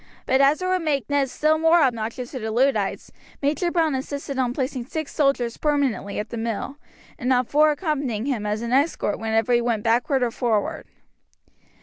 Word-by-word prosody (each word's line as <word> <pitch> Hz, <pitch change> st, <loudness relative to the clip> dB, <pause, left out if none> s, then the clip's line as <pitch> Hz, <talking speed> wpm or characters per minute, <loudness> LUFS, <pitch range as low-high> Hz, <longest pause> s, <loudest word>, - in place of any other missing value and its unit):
But 265 Hz, +1 st, +3 dB
as 285 Hz, +6 st, +3 dB
it -, -, -1 dB
would 370 Hz, 0 st, +1 dB
make 285 Hz, -7 st, -1 dB
Ned 280 Hz, -2 st, +2 dB
still 310 Hz, +4 st, +1 dB
more 325 Hz, +2 st, +5 dB
obnoxious 235 Hz, 0 st, -2 dB
to 260 Hz, -, -5 dB
the 220 Hz, -1 st, -4 dB
Luddites, 225 Hz, -3 st, 0 dB, 0.3 s
Major 300 Hz, +5 st, 0 dB
Browne 330 Hz, -3 st, +1 dB
insisted 275 Hz, +1 st, -4 dB
on 250 Hz, -2 st, +1 dB
placing 255 Hz, -1 st, -3 dB
six 315 Hz, 0 st, -5 dB
soldiers 275 Hz, -5 st, +1 dB
permanently 275 Hz, -10 st, 0 dB
at 210 Hz, +1 st, -4 dB
the 235 Hz, -, -5 dB
mill 230 Hz, +5 st, -3 dB, 0.4 s
and 250 Hz, +1 st, 0 dB
on 250 Hz, 0 st, +3 dB
four 300 Hz, +5 st, +4 dB
accompanying 290 Hz, -, -2 dB
him 255 Hz, -7 st, -1 dB
as 210 Hz, +2 st, -2 dB
an 235 Hz, +1 st, -2 dB
escort 275 Hz, -6 st, +1 dB
whenever 225 Hz, +1 st, +1 dB
he 240 Hz, -, +4 dB
went 230 Hz, -3 st, -1 dB
backward 245 Hz, +3 st, +2 dB
or 240 Hz, -, 0 dB
forward. 225 Hz, -4 st, -1 dB
260 Hz, 190 wpm, -23 LUFS, 230-290 Hz, 0.4 s, more